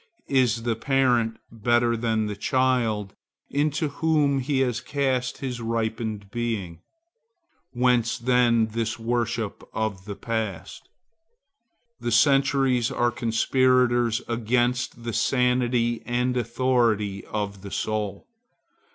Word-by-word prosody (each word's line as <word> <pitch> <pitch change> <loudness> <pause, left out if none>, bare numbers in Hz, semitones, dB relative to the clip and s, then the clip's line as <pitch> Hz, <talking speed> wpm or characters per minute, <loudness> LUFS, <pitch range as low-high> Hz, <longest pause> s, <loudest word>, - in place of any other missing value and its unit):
Is 120 -3 +2
the 115 -1 0
parent 120 -3 +1
better 120 +1 +2
than 110 -1 0
the 105 -1 -4
child 115 -3 0 0.4
into 150 +1 0
whom 145 -2 +1
he 135 +1 0
has 120 -2 0
cast 130 -3 -1
his 125 -3 -5
ripened 110 -3 -3
being? 110 -8 -3 0.9
Whence 125 -2 +1
then 120 -2 +3
this 115 +1 -2
worship 115 -2 -2
of 110 -4 -3
the 105 -2 -6
past? 105 -6 -4 1.1
The 120 - -3
centuries 135 -1 +3
are 120 0 +1
conspirators 120 0 +2
against 120 +1 0
the 115 -1 -4
sanity 125 -2 +1
and 125 +1 0
authority 115 -4 +1
of 100 -2 -4
the 100 - -8
soul. 105 0 -3
120 Hz, 110 wpm, -25 LUFS, 110-125 Hz, 1.1 s, then